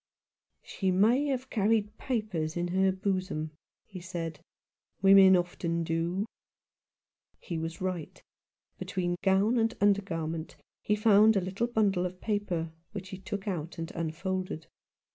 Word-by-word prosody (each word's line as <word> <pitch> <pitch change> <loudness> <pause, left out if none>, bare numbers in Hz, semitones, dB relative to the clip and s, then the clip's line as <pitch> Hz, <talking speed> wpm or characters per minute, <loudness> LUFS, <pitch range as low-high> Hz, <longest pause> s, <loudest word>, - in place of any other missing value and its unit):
" - - -55
She 190 - 0
may 225 +10 +3
have 260 -2 -2
carried 215 0 +1
papers 205 - -2
in 175 0 -1
her 190 +1 +3
bosom," 185 -5 -2 0.3
he 190 -3 -9
said. 170 -3 -5 0.6
"Women 195 -1 +8
often 175 -1 -1
do." 165 +4 -1 1.1
He 170 -3 -5
was 165 +2 -5
right. 185 -4 -4 0.6
Between 175 -2 -2
gown 200 +5 +3
and 225 0 +1
under 205 0 +4
garment 165 -3 -4 0.3
he 210 - +1
found 215 0 +5
a - - +4
little 190 +6 -2
bundle 200 -6 +1
of 180 0 -11
paper, 185 -7 -2 0.2
which 195 -2 -6
he 190 -2 -7
took 195 +1 -5
out 170 -4 -3
and 165 0 -5
unfolded. 170 +1 -3
190 Hz, 140 wpm, -29 LUFS, 170-205 Hz, 1.1 s, Women